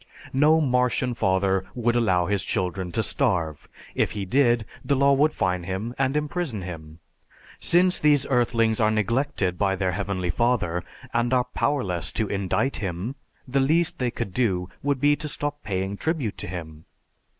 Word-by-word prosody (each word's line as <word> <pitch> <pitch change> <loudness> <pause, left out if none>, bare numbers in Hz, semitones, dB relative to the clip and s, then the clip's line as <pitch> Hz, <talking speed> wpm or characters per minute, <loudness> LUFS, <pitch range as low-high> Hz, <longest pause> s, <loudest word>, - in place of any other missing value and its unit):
No 150 +4 +5
Martian 125 -2 +1
father 95 -2 +1
would 120 -1 +1
allow 95 -7 +2
his 100 +1 0
children 90 0 -2
to - - 0
starve; 80 -5 -1 0.2
if - - 0
he 100 -2 -3
did, 120 0 +3 0.2
the 140 - +1
law 140 +1 +4
would 150 +3 +3
fine 90 -6 -1
him 95 +6 -4
and 135 +2 0
imprison 150 - -2
him. 80 -3 -8 0.6
Since 180 +1 +3
these 145 -2 +4
earthlings 115 -3 +2
are 110 -1 +4
neglected 110 -3 0
by 95 -1 +2
their 95 -1 0
Heavenly 95 -2 -2
Father, 100 -7 0 0.3
and 120 +1 +1
are 125 -1 +2
powerless 95 - -1
to 110 - 0
indict 100 +8 -1
him, 95 +5 -3 0.3
the 135 +2 +1
least 160 +5 +2
they 125 -1 +1
could 100 -5 -5
do 95 -6 0
would 140 -1 0
be 145 +2 +4
to 150 - -5
stop 145 0 -3
paying 95 0 -3
tribute 150 - -2
to - - -4
him. 80 -3 -7
110 Hz, 165 wpm, -25 LUFS, 95-135 Hz, 0.6 s, No